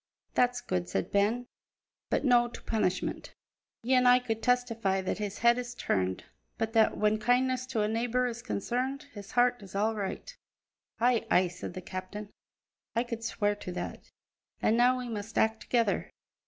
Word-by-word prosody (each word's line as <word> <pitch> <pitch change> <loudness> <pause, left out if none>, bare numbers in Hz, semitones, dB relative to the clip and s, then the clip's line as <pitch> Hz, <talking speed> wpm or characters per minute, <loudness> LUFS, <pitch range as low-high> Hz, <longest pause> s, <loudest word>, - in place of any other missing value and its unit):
"That's 245 0 +2
good," 90 - -2
said 95 +1 -2
Ben, 215 +5 +2 0.6
"but - - 0
no' 240 -2 +5
to 240 - -10
punishment. 215 -5 -1 0.5
Ye 255 +3 +1
an' 250 -1 +5
I 245 0 +8
could 225 -3 -3
testify 230 -6 +1
that 190 - -2
his 205 -1 -3
head 235 +1 +4
is 245 0 -6
turned, 95 - -1 0.3
but 225 0 -2
that, 220 -1 +4
when 215 0 +2
kindness 255 +2 +2
to 235 -4 -1
a - - +1
neebour 240 +3 0
is 235 -1 -3
concerned, 250 +5 -2
his 200 -2 -10
heart 245 -1 +3
is 195 -1 -11
all 215 +3 +2
right." 215 - -5 0.6
"Ay, 240 0 +2
ay," 180 0 +4
said 180 - -7
the 185 - -5
captain, 185 +3 -6 0.7
"I 235 - +2
could 230 -2 -6
swear 205 -2 0
to 185 - -6
that. 175 - -6 0.5
And 220 - +3
now 250 +2 +4
we 250 -1 -4
must 220 -1 -5
act 220 0 +2
together. 230 -5 +1
230 Hz, 175 wpm, -30 LUFS, 205-245 Hz, 0.7 s, I